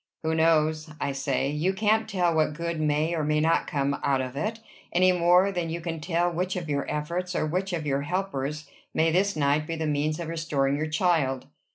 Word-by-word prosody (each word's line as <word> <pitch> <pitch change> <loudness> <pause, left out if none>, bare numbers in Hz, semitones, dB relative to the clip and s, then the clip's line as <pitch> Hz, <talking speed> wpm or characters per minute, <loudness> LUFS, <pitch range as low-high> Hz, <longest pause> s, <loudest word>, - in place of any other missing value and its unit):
"Who 160 0 0
knows? 160 -1 +2
I 140 - -1
say. 135 0 -1
You 160 +6 0
can't 220 +2 +1
tell 180 -3 +1
what 155 -1 +2
good 170 0 -3
may 155 +2 +1
or 160 -2 -1
may 150 +1 +1
not 165 +2 +2
come 140 0 -1
out 135 -1 +2
of 130 0 -4
it, 215 +9 -2 0.3
any 185 +1 +4
more 180 +2 +4
than 175 -3 -2
you 165 +1 -3
can 165 -1 -4
tell 175 +2 0
which 180 +2 -2
of 175 -3 -4
your 140 -1 -2
efforts, 175 +4 -3
or - - +1
which 185 +5 -2
of 165 -3 -3
your 140 -1 0
helpers, 150 -4 -3 0.3
may 160 +1 +3
this 195 +4 +2
night 150 +1 +1
be 165 - -3
the 160 0 -2
means 150 +1 0
of 170 - -4
restoring 145 -4 0
your 155 +2 -2
child." 155 -5 +1
160 Hz, 215 wpm, -26 LUFS, 150-175 Hz, 0.3 s, any